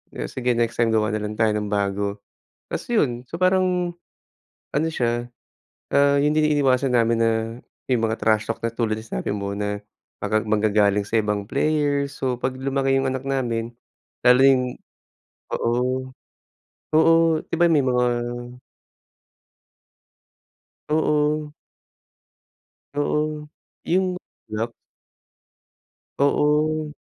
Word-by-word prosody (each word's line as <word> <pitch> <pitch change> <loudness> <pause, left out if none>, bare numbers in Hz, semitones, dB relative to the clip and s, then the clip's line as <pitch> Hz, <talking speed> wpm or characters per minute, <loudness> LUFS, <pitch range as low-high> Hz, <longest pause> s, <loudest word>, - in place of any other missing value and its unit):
o - - -3
sige 125 -1 -1
next 120 0 0
time 120 -1 +3
gawa 110 -1 +1
nalang 105 0 -3
tayo 110 -1 +4
ng 105 -1 -2
bago. 100 0 -1 0.5
Ta's - - -4
yun. 135 - +1
So, 170 - -5
parang 185 -1 +2 0.8
ano 155 +3 +1
siya, 120 -5 -1 0.7
ah, 140 0 +5
yung 150 +1 +2
din 155 0 +3
iniiwasan 135 -2 +2
namin 115 0 +2
na 115 - +3 0.6
yung 125 -3 +1
mga 110 0 0
trash 110 -1 +2
talk - - -8
na 115 - -1
tulad 110 -2 -1
na - - -10
sinasabi - - -3
mo 100 -1 -3
na 105 0 -2 0.4
mag 110 +1 0
maggagaling 105 -2 +2
sa 115 - +1
ibang 105 -1 -2
player. 145 0 +1
So, 130 -3 -2
'pag 130 +1 -3
lumaki 135 0 +1
yung 135 - 0
anak 130 0 -2
namin, 120 -4 -2 0.6
lalo 125 +1 +7
yung 135 -2 +5 0.9
oo. 130 +2 -1 0.8
Oo, 165 0 +4
di - - -4
ba 175 - +6
may 155 -4 +4
mga 125 -1 +2 2.8
Oo. 150 -1 +1 1.4
Oo, 150 +1 -1 0.4
yung 185 +1 +1 0.4
lock. 115 +2 -2 1.5
Oo. 150 +2 +1
130 Hz, 120 wpm, -23 LUFS, 110-150 Hz, 2.8 s, lalo